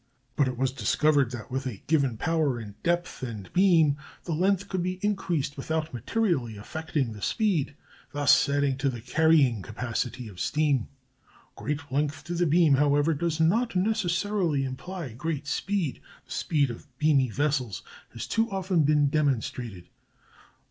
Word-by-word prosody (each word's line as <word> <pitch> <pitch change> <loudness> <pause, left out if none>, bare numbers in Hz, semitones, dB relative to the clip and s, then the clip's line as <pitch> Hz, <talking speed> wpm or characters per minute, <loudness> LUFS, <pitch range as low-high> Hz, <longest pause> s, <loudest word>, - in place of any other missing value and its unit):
But 140 - +3
it 130 -1 -3
was 130 +1 +1
discovered 140 0 +2
that 120 -2 -8
with 135 +1 -2
a 110 -7 -7
given 140 -7 +1
power 155 -3 +1
and 105 -3 -8
depth 175 -2 -1
and 110 -7 -6
beam 165 -6 +4 0.3
the 170 - -3
length 195 +4 +1
could 190 -2 -2
be 185 +1 -2
increased 175 -9 -1
without 160 +3 -2
materially 125 - -1
affecting 145 +1 -3
the 105 - -10
speed, 180 - 0 0.4
thus 145 0 +4
adding 140 -2 +1
to 140 - +1
the 120 -2 -5
carrying 135 -2 +3
capacity 120 +3 -4
of 95 -4 -11
steam. 145 - +1 0.7
Great 145 -1 -4
length 145 +2 -1
to 175 0 -1
beam, 160 -1 +5
however, 145 +3 +3
does 165 +1 -1
not 220 +8 +2
necessarily 185 -5 +1
imply 135 +2 -6
great 150 +3 -3
speed; 180 0 -2 0.2
the - - -19
speed 145 -5 +1
of 115 - -10
beamy 145 -4 +3
vessels 130 - -1 0.3
has - - -6
too 225 +1 0
often 190 -3 +1
been 150 0 +3
demonstrated. 125 - -1
145 Hz, 150 wpm, -27 LUFS, 130-170 Hz, 0.7 s, beam